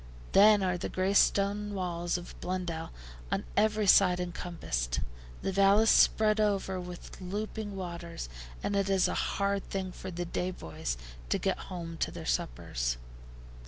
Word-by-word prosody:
Then 205 0 +7
are 180 -1 0
the - - -3
gray 185 +1 0
stone 205 +1 +3
walls 175 -2 -1
of 175 - -9
Blundell 180 -3 -3 0.4
on - - 0
every 215 0 +3
side 180 -2 +6
encompassed, 170 - -3 0.4
the 195 - 0
vale 195 +1 +5
is 220 - +5
spread 215 0 +5
over 195 -3 +1
with 180 +1 -9
looping 205 +2 -4
waters, 170 - -5 0.4
and 205 - 0
it 195 0 +1
is 195 -1 +4
a - - -1 0.2
hard 200 0 0
thing 190 -1 -3
for 185 - -7
the 175 -1 -4
day 180 +1 -2
boys 80 - -4 0.3
to - - +2
get - - -1
home 170 -2 -6
to - - 0
their - - -8
suppers. - - -1
185 Hz, 160 wpm, -30 LUFS, 170-200 Hz, 0.4 s, Then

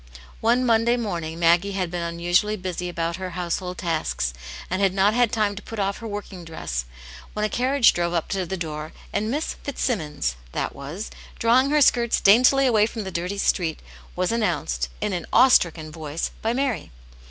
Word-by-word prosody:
One 240 +3 +2
Monday 235 +1 +3
morning 170 -8 -3
Maggie 175 +4 +3
had 185 -3 -2
been 175 -1 -3
unusually 175 +5 +1
busy 180 -2 -4
about 170 0 -2
her 185 -1 -4
household 180 +1 -3
tasks, 155 - -1 0.3
and 185 +2 -2
had 195 -1 +2
not 200 +2 +4
had 245 -1 +3
time 210 -3 +1
to 205 - -7
put 225 - -8
off 200 -1 -1
her 230 - -6
working 205 -3 -6
dress 65 - -4 0.5
when 210 0 -1
a - - 0
carriage 255 +1 +4
drove 175 0 -1
up 165 - 0
to 190 -3 -2
the 190 - -3
door, 155 -2 -5 0.2
and 215 +1 0
Miss 295 +6 -1
Fitzsimmons 155 - -2
" - - -23
that - - -2
was," 150 +10 -7 0.3
drawing 250 +4 +4
her 300 0 +3
skirts 235 -3 +4
daintily 250 +7 +6
away 220 -4 +4
from 225 -1 -5
the 190 - -5
dirty 180 +3 -3
street, 170 -5 0 0.4
was 185 +2 0
announced, 150 - -1
in 210 - -1
an 175 -2 -3
awe 255 +3 +7
stricken 160 -8 +2
voice, 155 0 -4
by 225 - 0
Mary. 260 -1 -1
190 Hz, 190 wpm, -24 LUFS, 170-225 Hz, 0.5 s, awe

